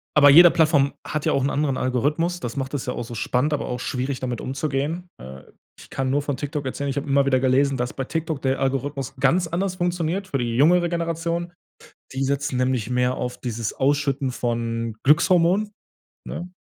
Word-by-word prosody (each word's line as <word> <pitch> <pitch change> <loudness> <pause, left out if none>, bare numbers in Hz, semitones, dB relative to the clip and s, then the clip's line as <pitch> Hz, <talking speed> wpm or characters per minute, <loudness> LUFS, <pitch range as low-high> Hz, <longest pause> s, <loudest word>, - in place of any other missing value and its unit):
aber 145 -1 +7
jede 175 +3 +9
Plattform 155 -4 +3
hat 155 -1 -3
ja - - +2
auch 135 - +1
'n 140 - +1
anderen 140 -2 0
Algorithmus. 150 +8 0
Das 120 -2 -6
macht 135 0 -3
es 140 -3 -3
ja 125 - -1
auch - - -4
so 120 - -9
spannend, 130 +7 0
aber 145 - -2
auch 125 - -3
schwierig, 130 +1 -3
damit 125 -2 -4
umzugehen. 145 +5 -3
Äh, 65 +1 -10 0.4
ich - - -14
kann 135 -1 -2
nur 145 +2 +1
von 145 -2 -3
TikTok 145 -1 -4
erzählen, 140 +2 -3
ich 135 - -3
habe 140 - -3
immer 140 0 +3
wieder 130 -1 +3
gelesen, 135 +1 +2
dass 125 +1 -2
bei 135 - -3
TikTok 160 0 -3
der 135 0 0
Algorithmus 135 0 -2
ganz 155 +7 +3
anders 180 +3 -2
funktioniert 175 +1 -1
für 140 - -2
die 120 -1 -2
jungere 175 +6 +4
Generation. 170 +1 -2 0.6
Die 135 +1 -1
setzen 140 0 -1
nämlich 125 -3 0
mehr 125 0 +1
auf 125 - -4
dieses 115 -3 -4
ausschütten 140 -1 0
von 115 -2 -2
Glückshormonen, 175 +6 +3 0.6
ne? 175 +2 -6
140 Hz, 200 wpm, -23 LUFS, 130-160 Hz, 0.6 s, jede